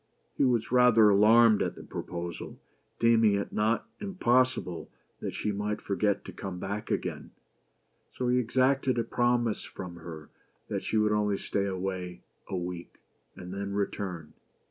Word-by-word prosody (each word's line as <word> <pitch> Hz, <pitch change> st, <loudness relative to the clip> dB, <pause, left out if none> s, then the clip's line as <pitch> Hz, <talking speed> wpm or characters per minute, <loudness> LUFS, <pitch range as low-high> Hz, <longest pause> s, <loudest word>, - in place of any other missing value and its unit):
He -, -, +1 dB
was 120 Hz, -3 st, +1 dB
rather 120 Hz, -4 st, +6 dB
alarmed 110 Hz, +2 st, +6 dB
at -, -, -1 dB
the -, -, -10 dB
proposal, 85 Hz, 0 st, -6 dB, 0.4 s
deeming 115 Hz, -3 st, +4 dB
it 100 Hz, -, -3 dB
not 110 Hz, +2 st, +1 dB
impossible 130 Hz, -, +1 dB, 0.3 s
that -, -, -5 dB
she 105 Hz, -, -1 dB
might 105 Hz, +1 st, -2 dB
forget 100 Hz, +1 st, 0 dB
to -, -, -7 dB
come 95 Hz, -2 st, -6 dB
back 100 Hz, +3 st, -4 dB
again; -, -, -3 dB, 0.8 s
so 125 Hz, -, -3 dB
he 125 Hz, +1 st, +3 dB
exacted 130 Hz, +2 st, +2 dB
a 115 Hz, -, +2 dB
promise 120 Hz, -1 st, +1 dB
from 90 Hz, -2 st, -8 dB
her 80 Hz, -2 st, -10 dB, 0.4 s
that -, -, -2 dB
she 110 Hz, -, -1 dB
would 105 Hz, 0 st, +3 dB
only 105 Hz, -1 st, +1 dB
stay 100 Hz, 0 st, -1 dB
away 95 Hz, -2 st, -4 dB, 0.3 s
a 95 Hz, -, -2 dB
week, 90 Hz, -1 st, -6 dB, 0.4 s
and 90 Hz, 0 st, -8 dB
then 100 Hz, 0 st, -4 dB
return. 95 Hz, -5 st, -3 dB
105 Hz, 150 wpm, -29 LUFS, 95-120 Hz, 0.8 s, rather